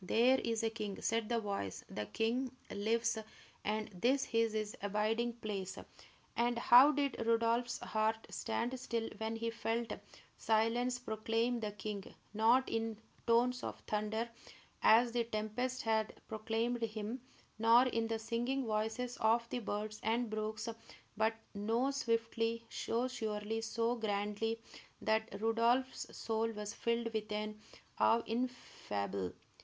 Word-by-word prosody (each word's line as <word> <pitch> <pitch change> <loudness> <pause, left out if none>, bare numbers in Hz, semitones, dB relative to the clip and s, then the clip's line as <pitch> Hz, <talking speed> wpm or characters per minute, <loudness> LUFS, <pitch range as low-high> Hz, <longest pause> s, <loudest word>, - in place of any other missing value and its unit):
"There 245 +7 +4
is 230 -1 -1
a 225 - +1
king!" 210 -3 -4
said 225 -1 0
the 235 -1 +2
voice. 200 - -3
"The 105 0 -4
king 240 +4 0 0.2
lives, 225 +2 +1 0.4
and 215 +1 -1
this 245 +8 +1
is 230 -1 +3
his 215 -1 -2
abiding 215 +4 +1
place!" 205 -5 -4 0.6
And 240 0 +2
how 245 +4 +8
did 280 -5 0
Rodolph's 230 +1 +2
heart 220 +1 0
stand 240 +3 -2
still 230 -3 -2
when 220 +1 -2
he 230 0 -2
felt 230 0 -1 0.5
Silence 230 +3 +2
proclaim 225 +1 0
the 210 -2 -2
king, 205 -1 -4 0.3
not 230 +5 +4
in 225 -1 -1 0.3
tones 245 +2 +4
of - - -5
thunder, 215 +2 -1 0.5
as 235 +2 +6
the 240 0 +1
tempest 230 +3 -2
had 220 -1 +1
proclaimed 225 +2 -1
him, 220 +2 -3 0.4
nor 230 +3 +7
in 230 -3 0
the 225 0 0
singing 240 +4 -1
voices 220 +3 -1
of 230 +2 +3
the 250 - -1
birds 215 -1 -3
and 230 +1 0
brooks, 215 +1 -2 0.5
but 220 +1 +2 0.2
so 225 +6 +1
swiftly, 230 -3 0
so 235 +3 0
surely, 220 -3 -2
so 230 +1 0
grandly, 210 +1 -1 0.4
that 220 -2 0
Rodolph's 230 +4 +2
soul 225 0 0
was 210 0 -5
filled 235 0 -1
with 215 -1 -2 0.7
awe 230 +1 +5
ineffable. 100 - -3
225 Hz, 135 wpm, -35 LUFS, 215-235 Hz, 0.7 s, how